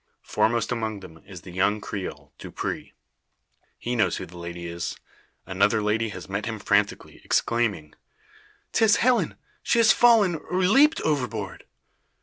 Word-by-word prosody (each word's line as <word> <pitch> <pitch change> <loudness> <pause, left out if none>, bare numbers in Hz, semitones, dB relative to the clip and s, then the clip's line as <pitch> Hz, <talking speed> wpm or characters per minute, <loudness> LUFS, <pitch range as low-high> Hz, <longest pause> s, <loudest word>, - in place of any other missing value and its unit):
Foremost 110 +2 0
among 110 -4 -3
them 80 -3 -13
is 95 -4 -10
the 90 - -11
young 100 +4 +1
Creole, 75 -9 -7
Dupre. - - -5 0.9
He 120 +1 -3
knows 110 - +1
who - - -6
the 90 - -15
lady 85 0 -7
is. 85 -1 -5 0.5
Another 100 +3 +2
lady 110 +2 0
has 90 -6 -8
met - - -3
him - - -3
frantically, - - 0
exclaiming 110 -10 0 0.8
"'Tis 220 -2 +4
Helen! 250 0 +2 0.3
She - - +1
has 230 -2 +6
fallen, 220 -8 +5
or 180 - -5
leaped 275 - +4
overboard." 125 -10 -2
110 Hz, 140 wpm, -25 LUFS, 90-150 Hz, 0.9 s, has